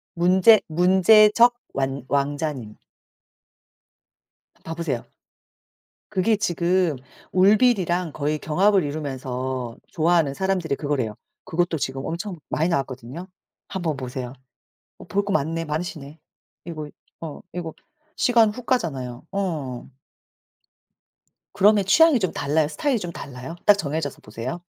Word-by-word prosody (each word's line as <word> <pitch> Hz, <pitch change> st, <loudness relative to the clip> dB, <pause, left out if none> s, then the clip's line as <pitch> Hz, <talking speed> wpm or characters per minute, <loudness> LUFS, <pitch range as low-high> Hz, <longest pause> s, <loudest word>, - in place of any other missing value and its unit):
문제 185 Hz, +5 st, +5 dB
문제적 210 Hz, +7 st, +5 dB, 0.2 s
완 135 Hz, -1 st, -2 dB
왕자님. 140 Hz, -5 st, -2 dB, 1.9 s
봐 165 Hz, -, -5 dB
보세요. 155 Hz, -8 st, -3 dB, 1.1 s
그게 205 Hz, +4 st, +2 dB
지금 175 Hz, -3 st, +1 dB, 0.4 s
울빌이랑 185 Hz, -, +3 dB
거의 150 Hz, +1 st, -1 dB
경합을 190 Hz, +6 st, +2 dB
이루면서 130 Hz, -4 st, -4 dB
좋아하는 165 Hz, -3 st, +2 dB
사람들이 185 Hz, -4 st, -1 dB
그거래요. 135 Hz, -8 st, -2 dB, 0.3 s
그것도 175 Hz, 0 st, 0 dB
지금 135 Hz, -1 st, -3 dB
엄청 175 Hz, +2 st, -4 dB
많이 160 Hz, +3 st, 0 dB
나왔거든요. 135 Hz, +1 st, -3 dB, 0.4 s
한번 170 Hz, -6 st, -2 dB
보세요. 125 Hz, -1 st, -5 dB, 0.7 s
어 -, -, -11 dB
볼 200 Hz, 0 st, 0 dB
거 200 Hz, -, -2 dB
많네 165 Hz, -1 st, 0 dB
많으시네. 155 Hz, -1 st, -5 dB, 0.5 s
이거 155 Hz, -3 st, -6 dB, 0.3 s
어 160 Hz, -3 st, -7 dB
이거 170 Hz, -2 st, -5 dB, 0.4 s
시간 230 Hz, -3 st, +4 dB
훅 235 Hz, +3 st, -9 dB
가잖아요. 135 Hz, -, -2 dB
어. 155 Hz, -12 st, -3 dB, 1.6 s
그러면 205 Hz, 0 st, +4 dB
취향이 320 Hz, -, +5 dB
좀 185 Hz, -5 st, -1 dB
달라요? 150 Hz, +1 st, 0 dB
스타일이 250 Hz, -, 0 dB
좀 175 Hz, -3 st, -6 dB
달라요? 135 Hz, +5 st, -8 dB
딱 205 Hz, -, +8 dB
정해져서 150 Hz, -3 st, -3 dB
보세요? 115 Hz, +9 st, -6 dB
165 Hz, 265 characters per minute, -23 LUFS, 140-190 Hz, 1.9 s, 딱